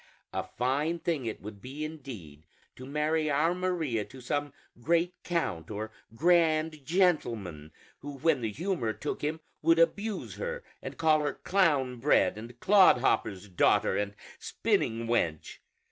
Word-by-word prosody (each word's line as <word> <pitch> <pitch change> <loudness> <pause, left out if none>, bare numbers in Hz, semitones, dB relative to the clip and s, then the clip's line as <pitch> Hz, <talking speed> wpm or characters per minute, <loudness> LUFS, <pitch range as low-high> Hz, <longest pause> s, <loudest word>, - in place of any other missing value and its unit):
A - - 0 0.2
fine 145 +7 +1
thing 160 -7 -2
it 110 - -5
would 105 -1 -9
be, 140 +6 -5
indeed, 115 - -9 0.3
to 130 - -10
marry 155 +2 0
our 155 +4 +2
Maria 170 -11 -1
to 135 - -13
some 145 +3 -2 0.3
great 170 +5 +2
count 105 - -2
or 110 +1 -5 0.2
grand 160 -1 +2
gentleman 115 - 0 0.3
who 145 0 -8
when 150 -1 +2
the 110 -2 -2
humor 160 - -2
took 145 - -4
him 155 +2 -2 0.2
would 165 +1 +4
abuse 200 +6 0
her, 485 0 -4 0.2
and - - -7
call 155 -1 +4
her 145 -1 -1
'clown 145 -10 +1
bred' 115 -8 +3
and 120 +2 -10
'clodhopper's 125 - +4
daughter' 90 -3 +3
and 100 0 -2 0.2
'spinning 115 +1 0
wench.' 85 -10 -1
145 Hz, 145 wpm, -29 LUFS, 115-165 Hz, 0.3 s, would